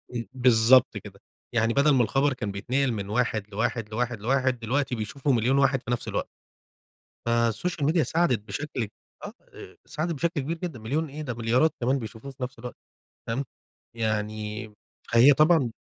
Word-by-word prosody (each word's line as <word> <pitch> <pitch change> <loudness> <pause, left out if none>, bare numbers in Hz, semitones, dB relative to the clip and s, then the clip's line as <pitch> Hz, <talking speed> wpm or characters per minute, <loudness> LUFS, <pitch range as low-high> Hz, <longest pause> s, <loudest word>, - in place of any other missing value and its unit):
إمم، 115 -1 -3
بالضبط 125 0 +5
كده، - - -11 0.3
يعني 115 0 +2
بدل 140 +3 +4
ما 125 - +4
الخبر 135 +6 +1
كان 105 -5 -4
بيتنقل 125 +7 0
من 100 -3 -4
واحد 110 -2 0
لواحد، 115 +1 -2
لواحد، 115 0 -2
لواحد، 130 +2 +1
دلوقتي 125 +3 -1
بيشوفه 125 +6 -2
مليون 125 +2 +2
واحد 135 -1 +3
في - - -5
نفس 120 - -2
الوقت، - - -2 1.0
فالسوشيال 120 +7 0
ميديا 160 +2 +3
ساعدت 155 - +1
بشكل 125 +2 -4 0.4
آه - - -7 0.2
إي - - -12
ساعدت 165 +2 -3
بشكل 165 +1 -1
كبير 160 +5 -3
جدًا، 165 -7 -5
مليون 145 +8 -2
إيه! 150 +3 -7
ده 130 -5 -4
مليارات 120 +7 +2
كمان 130 +3 +1
بيشوفوه 110 +3 -8
في 135 -1 -8
نفس 125 -1 -6
الوقت، 125 +1 -7 0.5
فاهم، 120 +5 -1 0.5
يعني 110 -1 -3 0.4
فهي 120 +5 +8
طبعًا 155 -3 +4
125 Hz, 165 wpm, -26 LUFS, 115-140 Hz, 1.0 s, فهي